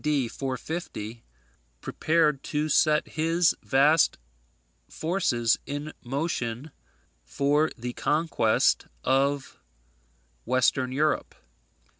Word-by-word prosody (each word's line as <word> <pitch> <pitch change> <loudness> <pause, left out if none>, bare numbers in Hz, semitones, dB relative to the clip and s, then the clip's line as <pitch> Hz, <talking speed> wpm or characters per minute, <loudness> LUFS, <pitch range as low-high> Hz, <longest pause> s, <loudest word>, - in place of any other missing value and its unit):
D. 145 -5 +1
450, 130 -4 -5 0.6
prepared 155 - +1
to 150 0 -1
set 150 0 +3
his 165 +2 +1
vast 145 +3 +3 0.7
forces 150 -10 0
in 145 +2 -5
motion 135 -1 -3 0.5
for 145 +3 +1
the 120 +1 -5
conquest 150 -8 +1 0.2
of 140 +1 0 0.8
Western 130 - +1
Europe. 150 +4 0
145 Hz, 80 wpm, -26 LUFS, 130-155 Hz, 0.8 s, set